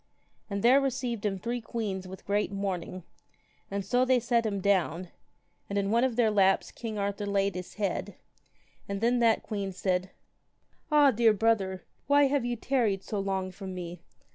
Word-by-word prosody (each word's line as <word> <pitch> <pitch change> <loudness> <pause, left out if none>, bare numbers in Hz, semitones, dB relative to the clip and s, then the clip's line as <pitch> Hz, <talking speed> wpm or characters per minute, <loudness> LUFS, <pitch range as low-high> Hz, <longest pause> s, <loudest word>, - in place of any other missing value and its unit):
And 200 -1 -3
there 260 +4 +6
received 245 -5 -1
him 195 -1 -2
three 235 +5 -3
queens 205 -5 -4
with 190 +1 -10
great 205 0 0
mourning, 185 -2 -4 0.7
and 200 -1 -3
so 245 +6 +2
they 255 -1 +3
set 235 -1 +1
him 200 -2 -2
down, 185 -3 +1 0.6
and 200 - -2
in 200 0 0
one 235 +2 +3
of 260 -3 +1
their 225 -2 +3
laps 195 -2 +3
king 225 -3 -6
Arthur 200 0 -2
laid 200 -1 +1
his 180 0 -7
head, 205 -2 -2 0.7
and 200 0 -2
then 240 +3 +2
that 230 -2 +3
queen 200 -2 -3
said, 185 0 -1 0.8
Ah, 295 -2 +6
dear 225 -1 +4
brother, 200 -4 +1 0.2
why 285 +1 +5
have 280 -1 +2
ye 240 0 -1
tarried 225 -6 0
so 210 - -3
long 190 -1 -2
from 190 0 -7
me? 175 -1 -7
200 Hz, 175 wpm, -29 LUFS, 190-235 Hz, 0.8 s, there